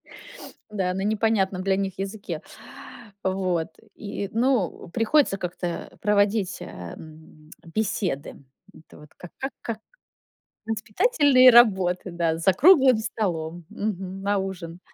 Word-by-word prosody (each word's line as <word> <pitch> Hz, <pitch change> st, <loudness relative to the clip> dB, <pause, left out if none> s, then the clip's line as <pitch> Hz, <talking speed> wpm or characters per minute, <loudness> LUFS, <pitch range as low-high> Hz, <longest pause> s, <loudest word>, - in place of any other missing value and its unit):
Т -, -, -13 dB, 0.2 s
Да, 190 Hz, -3 st, -1 dB
на 190 Hz, -, -3 dB
непонятном 205 Hz, -3 st, +1 dB
для 195 Hz, 0 st, +1 dB
них 195 Hz, -1 st, -3 dB
языке. 195 Hz, -5 st, -5 dB, 0.8 s
Вот. 185 Hz, -3 st, 0 dB, 0.3 s
И, 200 Hz, -1 st, -5 dB
ну, 230 Hz, -7 st, 0 dB
приходится 225 Hz, -, +2 dB
как-то 175 Hz, -1 st, -5 dB
проводить, 205 Hz, -1 st, +1 dB
эм, 155 Hz, -, -11 dB
беседы. 180 Hz, -5 st, -2 dB, 0.4 s
Это 160 Hz, -, -17 dB
вот 150 Hz, 0 st, -15 dB
как 180 Hz, -, -12 dB
как 270 Hz, +1 st, -4 dB
как 225 Hz, -2 st, -4 dB, 0.9 s
воспитательные 255 Hz, -, +4 dB
работы, 190 Hz, -7 st, +4 dB
да, 170 Hz, -2 st, 0 dB
за 180 Hz, +3 st, +3 dB
круглым 265 Hz, -, +6 dB
столом, 175 Hz, -6 st, -3 dB
мгм, 195 Hz, -3 st, -4 dB
на 200 Hz, 0 st, +1 dB
ужин. 180 Hz, -3 st, -6 dB
195 Hz, 115 wpm, -24 LUFS, 175-220 Hz, 0.9 s, круглым